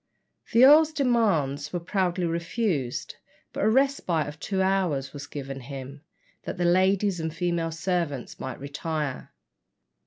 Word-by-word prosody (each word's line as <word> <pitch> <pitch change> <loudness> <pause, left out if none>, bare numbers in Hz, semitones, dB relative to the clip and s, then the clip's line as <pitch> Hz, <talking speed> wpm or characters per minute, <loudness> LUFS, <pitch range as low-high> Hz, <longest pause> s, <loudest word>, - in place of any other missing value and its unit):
The 240 +2 +7
earl's 305 +3 +7
demands 200 - +1
were 175 - -2
proudly 180 0 -1
refused, 170 - -2 0.4
but - - -2
a 215 - +4
respite 240 - +1
of 150 +2 -8
two 190 -2 -1
hours 175 -8 0
was 145 -1 -7
given 135 -1 -6
him, 135 +2 -8 0.4
that - - -6
the 175 - 0
ladies 190 +1 +3
and 160 0 -2
female 170 0 -1
servants 165 -5 -3
might 130 -2 -6
retire. 145 0 -4
170 Hz, 135 wpm, -26 LUFS, 145-195 Hz, 0.4 s, The